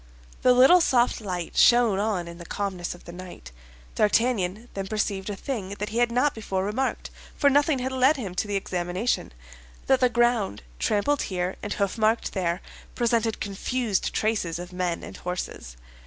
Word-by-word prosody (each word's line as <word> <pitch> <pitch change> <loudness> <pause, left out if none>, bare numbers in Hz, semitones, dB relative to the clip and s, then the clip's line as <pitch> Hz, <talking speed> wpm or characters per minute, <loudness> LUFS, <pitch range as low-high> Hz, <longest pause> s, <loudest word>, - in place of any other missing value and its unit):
The 250 - +5
little 265 +9 +7
soft 245 -6 +2
light 180 -5 -4
shone 235 -5 +5
on 200 -5 -1
in 170 0 -9
the 170 - -9
calmness 190 -4 -3
of 175 - -17
the - - -8
night. 175 - -10 0.4
D'Artagnan 215 -1 +1
then 195 -1 -4
perceived 205 -2 -2
a 205 - -3
thing 200 -5 -4
that 210 - -3
he 225 +3 -2
had 240 -1 +3
not 255 +4 +2
before 195 -4 -3
remarked—for 265 +5 -1
nothing 290 +1 +3
had 260 +1 -2
led 260 +3 +3
him 200 -8 -5
to 185 - -2
the 205 - -2
examination—that 175 - -2
the 250 - +4
ground, 240 - +1 0.2
trampled 270 +8 +1
here 180 -1 -2
and 205 - -3
hoofmarked 215 +3 0
there, 180 -2 -1 0.3
presented 230 -2 +1
confused 210 +1 -1
traces 210 -7 -1
of 175 +1 -8
men 180 -2 -2
and - - -9
horses. 180 - -5
205 Hz, 165 wpm, -26 LUFS, 180-240 Hz, 0.4 s, little